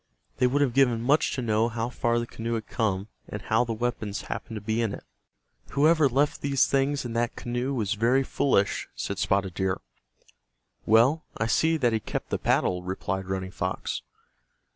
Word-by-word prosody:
They 125 Hz, -, +4 dB
would 145 Hz, +3 st, +2 dB
have 130 Hz, -4 st, 0 dB
given 120 Hz, -3 st, +3 dB
much 145 Hz, +5 st, +3 dB
to 130 Hz, -, -3 dB
know 110 Hz, 0 st, +2 dB
how 115 Hz, +1 st, -2 dB
far 120 Hz, -1 st, 0 dB
the 120 Hz, -, 0 dB
canoe 115 Hz, 0 st, -4 dB
had 110 Hz, -2 st, -3 dB
come, 100 Hz, -3 st, -1 dB, 0.2 s
and -, -, -5 dB
how -, -, +2 dB
the 120 Hz, -, -4 dB
weapons 110 Hz, -3 st, -3 dB
happened 115 Hz, -, -6 dB
to -, -, -3 dB
be 110 Hz, +3 st, -1 dB
in 110 Hz, -3 st, -1 dB
it. -, -, -12 dB, 0.7 s
"Whoever 155 Hz, 0 st, +4 dB
left 140 Hz, +4 st, +1 dB
these 140 Hz, -2 st, +3 dB
things 140 Hz, 0 st, +1 dB
in 120 Hz, -, -4 dB
that 120 Hz, 0 st, 0 dB
canoe 120 Hz, +2 st, -2 dB
was 110 Hz, -3 st, 0 dB
very 120 Hz, +5 st, +2 dB
foolish," 130 Hz, -7 st, +1 dB
said -, -, -4 dB
Spotted 95 Hz, -2 st, +1 dB
Deer. 95 Hz, 0 st, -1 dB, 1.1 s
"Well, 120 Hz, +9 st, +5 dB
I 115 Hz, -, 0 dB
see 160 Hz, +8 st, +2 dB
that 120 Hz, -6 st, +2 dB
he 110 Hz, -, +2 dB
kept -, -, -5 dB
the -, -, 0 dB
paddle," 90 Hz, -1 st, +1 dB
replied 95 Hz, +1 st, -3 dB
Running 95 Hz, -1 st, -3 dB
Fox. 95 Hz, -1 st, -3 dB
115 Hz, 185 wpm, -27 LUFS, 105-135 Hz, 1.1 s, Well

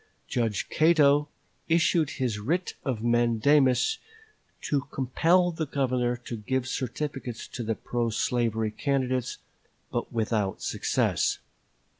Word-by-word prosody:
Judge 115 Hz, -5 st, -1 dB
Cato 150 Hz, -2 st, +4 dB, 0.4 s
issued 165 Hz, -2 st, +3 dB
his 120 Hz, -6 st, -1 dB
writ 170 Hz, -, -1 dB
of 120 Hz, -5 st, -2 dB
mandamus 120 Hz, -, +3 dB, 0.6 s
to 140 Hz, -2 st, -1 dB
compel 170 Hz, +7 st, +2 dB
the 160 Hz, -2 st, -3 dB
Governor 125 Hz, -3 st, 0 dB
to 120 Hz, -1 st, -7 dB
give 130 Hz, +4 st, -2 dB
certificates 130 Hz, -1 st, -4 dB
to 125 Hz, -, -6 dB
the 115 Hz, -1 st, -1 dB
pro 120 Hz, +1 st, -2 dB
slavery 110 Hz, -1 st, 0 dB
candidates, 130 Hz, -1 st, -1 dB, 0.5 s
but -, -, -3 dB
without 110 Hz, -3 st, -1 dB
success. -, -, +1 dB
130 Hz, 110 wpm, -27 LUFS, 115-145 Hz, 0.6 s, Cato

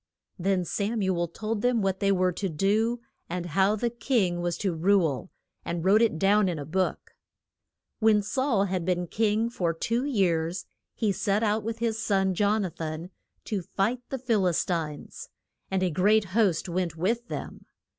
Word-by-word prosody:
Then 185 Hz, 0 st, +1 dB
Sam 210 Hz, +5 st, -1 dB
u 190 Hz, -1 st, +1 dB
el 170 Hz, 0 st, 0 dB
told 215 Hz, +5 st, -4 dB
them 245 Hz, -3 st, +2 dB
what 190 Hz, -1 st, 0 dB
they 200 Hz, -1 st, +2 dB
were 185 Hz, -1 st, +2 dB
to 195 Hz, +2 st, -3 dB
do, 215 Hz, +8 st, +1 dB, 0.3 s
and 175 Hz, 0 st, -3 dB
how 190 Hz, +5 st, +2 dB
the 235 Hz, +2 st, -1 dB
king 220 Hz, -8 st, 0 dB
was 175 Hz, -1 st, -1 dB
to 190 Hz, -4 st, -1 dB
rule, 170 Hz, -3 st, +1 dB, 0.3 s
and 170 Hz, 0 st, -3 dB
wrote 205 Hz, +4 st, +5 dB
it 225 Hz, -8 st, +2 dB
down 195 Hz, +2 st, +3 dB
in 170 Hz, -, -2 dB
a 145 Hz, -, -5 dB
book. 185 Hz, +5 st, -2 dB, 0.9 s
When 215 Hz, -2 st, +4 dB
Saul 240 Hz, -1 st, +1 dB
had 185 Hz, -2 st, -2 dB
been 180 Hz, 0 st, 0 dB
king 215 Hz, +4 st, +1 dB
for 175 Hz, -8 st, -1 dB
two 230 Hz, +8 st, -1 dB
years, 180 Hz, -, 0 dB, 0.3 s
he 215 Hz, -3 st, +1 dB
set 200 Hz, +3 st, 0 dB
out 215 Hz, 0 st, +1 dB
with 225 Hz, +1 st, -3 dB
his 225 Hz, -1 st, -1 dB
son, 195 Hz, -3 st, +1 dB
Jon 205 Hz, +2 st, +2 dB
a 180 Hz, -, -4 dB
than, 160 Hz, +3 st, -6 dB, 0.3 s
to 205 Hz, -3 st, -2 dB
fight 215 Hz, +8 st, -1 dB
the 270 Hz, -, -2 dB
Phil 230 Hz, -7 st, +1 dB
is 175 Hz, -, +1 dB
tines. 160 Hz, -5 st, -4 dB, 0.4 s
And 190 Hz, -1 st, 0 dB
a 180 Hz, -, +1 dB
great 205 Hz, +6 st, +3 dB
host 200 Hz, -6 st, +2 dB
went 175 Hz, -1 st, -2 dB
with 230 Hz, +8 st, 0 dB
them. -, -, -7 dB
195 Hz, 185 wpm, -27 LUFS, 175-220 Hz, 0.9 s, wrote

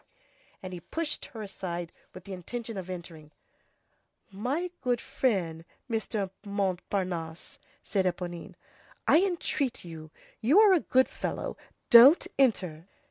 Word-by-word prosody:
And 185 Hz, -1 st, -6 dB
he 180 Hz, -, -5 dB
pushed 320 Hz, -, -2 dB
her 220 Hz, -2 st, -8 dB
aside 175 Hz, -4 st, -5 dB, 0.2 s
with 185 Hz, -, -11 dB
the 195 Hz, -, -8 dB
intention 225 Hz, +5 st, -6 dB
of 185 Hz, -2 st, -6 dB
entering. 170 Hz, -4 st, -8 dB, 1.0 s
"My 275 Hz, -, -2 dB
good 245 Hz, -2 st, +1 dB
friend, 190 Hz, -13 st, -1 dB, 0.2 s
Mr. 220 Hz, -4 st, -2 dB
Montparnasse," 185 Hz, -4 st, -3 dB, 0.2 s
said 195 Hz, -2 st, 0 dB
Éponine, 175 Hz, -1 st, -4 dB, 0.5 s
"I 320 Hz, -, +6 dB
entreat 325 Hz, -, -1 dB
you, 160 Hz, -2 st, -9 dB, 0.3 s
you 280 Hz, -, +5 dB
are 425 Hz, -3 st, +7 dB
a 360 Hz, -, +5 dB
good 260 Hz, -3 st, +3 dB
fellow, -, -, -4 dB, 0.4 s
don't 255 Hz, +8 st, +9 dB
enter." 185 Hz, -, +1 dB
195 Hz, 125 wpm, -29 LUFS, 175-255 Hz, 1.0 s, don't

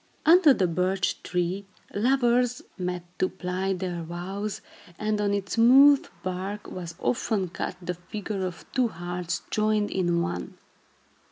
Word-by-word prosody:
Under 330 Hz, -1 st, +7 dB
the 200 Hz, -8 st, +3 dB
birch 185 Hz, +2 st, 0 dB
tree, 180 Hz, +3 st, -2 dB, 0.3 s
lovers 245 Hz, +1 st, +2 dB
met 180 Hz, -1 st, -3 dB, 0.2 s
to 185 Hz, -, +2 dB
plight 185 Hz, +1 st, -2 dB
their 175 Hz, -2 st, -3 dB
vows, 185 Hz, +5 st, -5 dB, 0.4 s
and 215 Hz, -1 st, 0 dB
on 205 Hz, -1 st, +1 dB
its 200 Hz, -1 st, -2 dB
smooth 270 Hz, +5 st, +7 dB, 0.2 s
bark 190 Hz, +3 st, -4 dB
was 170 Hz, -2 st, -6 dB
often 210 Hz, -6 st, 0 dB
cut 180 Hz, -, -4 dB
the 180 Hz, 0 st, -3 dB
figure 195 Hz, +3 st, -5 dB
of 180 Hz, -2 st, -5 dB
two 255 Hz, -2 st, +2 dB
hearts 175 Hz, -2 st, -4 dB
joined 215 Hz, -1 st, +1 dB
in 175 Hz, -2 st, +1 dB
one. 90 Hz, -, -4 dB
190 Hz, 140 wpm, -26 LUFS, 180-215 Hz, 0.4 s, Under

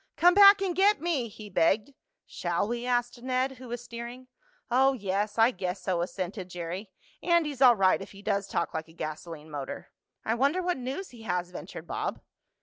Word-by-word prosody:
"Come 355 Hz, +1 st, +5 dB
back 400 Hz, 0 st, +8 dB
and 365 Hz, -3 st, -1 dB
get 405 Hz, +2 st, +4 dB
me!" 315 Hz, -8 st, -1 dB
he 215 Hz, 0 st, -11 dB
begged. 205 Hz, +7 st, +1 dB, 0.3 s
"Shall 175 Hz, +3 st, -2 dB
we?" 240 Hz, +2 st, -3 dB
asked 245 Hz, -1 st, 0 dB
Ned, 260 Hz, +1 st, -1 dB
who 255 Hz, -, -10 dB
was 240 Hz, 0 st, -5 dB
steering. 240 Hz, +2 st, -8 dB, 0.4 s
"Oh, 265 Hz, +2 st, +4 dB
yes, 205 Hz, -2 st, -2 dB
I 225 Hz, +2 st, +5 dB
guess 185 Hz, -3 st, -4 dB
so," 180 Hz, -2 st, 0 dB
assented 185 Hz, +1 st, -4 dB
Jerry. 180 Hz, +3 st, -5 dB, 0.3 s
"Andy's 320 Hz, -6 st, +1 dB
all 250 Hz, -3 st, +8 dB
right 190 Hz, -2 st, +3 dB
if 195 Hz, -, -9 dB
he 200 Hz, 0 st, -13 dB
does 200 Hz, -1 st, 0 dB
talk 170 Hz, -, -2 dB
like 160 Hz, 0 st, -4 dB
a 160 Hz, -, -17 dB
gasoline 155 Hz, -1 st, -7 dB
motor." 140 Hz, -2 st, -6 dB, 0.3 s
"I 220 Hz, -, +1 dB
wonder 280 Hz, +10 st, +1 dB
what 360 Hz, 0 st, 0 dB
news 265 Hz, +9 st, -5 dB
he 240 Hz, -2 st, -13 dB
has," 180 Hz, -4 st, -2 dB
ventured -, -, -8 dB
Bob. -, -, -3 dB
230 Hz, 190 wpm, -28 LUFS, 185-265 Hz, 0.4 s, back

